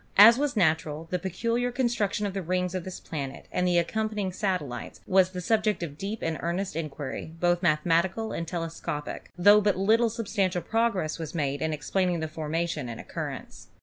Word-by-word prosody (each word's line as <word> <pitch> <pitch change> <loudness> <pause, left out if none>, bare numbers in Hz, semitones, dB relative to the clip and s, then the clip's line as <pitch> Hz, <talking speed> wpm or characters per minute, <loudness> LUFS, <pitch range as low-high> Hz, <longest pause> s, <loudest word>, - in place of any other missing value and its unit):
As 230 +5 +9
was 285 -5 0
natural, 160 -3 +1
the 180 - 0
peculiar 230 +7 -1
con 245 0 +1
struction 210 -3 0
of 200 - -2
the 195 - -2
rings 180 +1 -1
of 185 -2 -3
this 185 - -6
planet 140 -4 -6
and 180 - +1
the 175 -1 +3
accompany 215 +5 0
ing 190 - -2
satellites 175 - -3
was 190 -1 +4
the 180 -1 -5
subject 215 0 +1
of 145 -4 -5
deep 200 +6 -5
and 165 -1 -1
earnest 175 +1 -2
inquiry, 155 -1 -5
both 175 0 +2
mathematical 175 +6 +2
and 165 - -3
telescopic, 165 -3 -4
tho 205 +4 +7
but 205 -2 +2
little 225 +4 +4
substantial 195 -5 -1
progress 225 -9 0
was 160 0 -5
made 140 -3 -1
in 160 - 0
explaining 175 +4 0
the 160 - -2
formation 155 -2 -2
and 115 - -6
oc - - -11
currence. - - -6
180 Hz, 190 wpm, -27 LUFS, 160-205 Hz, -, As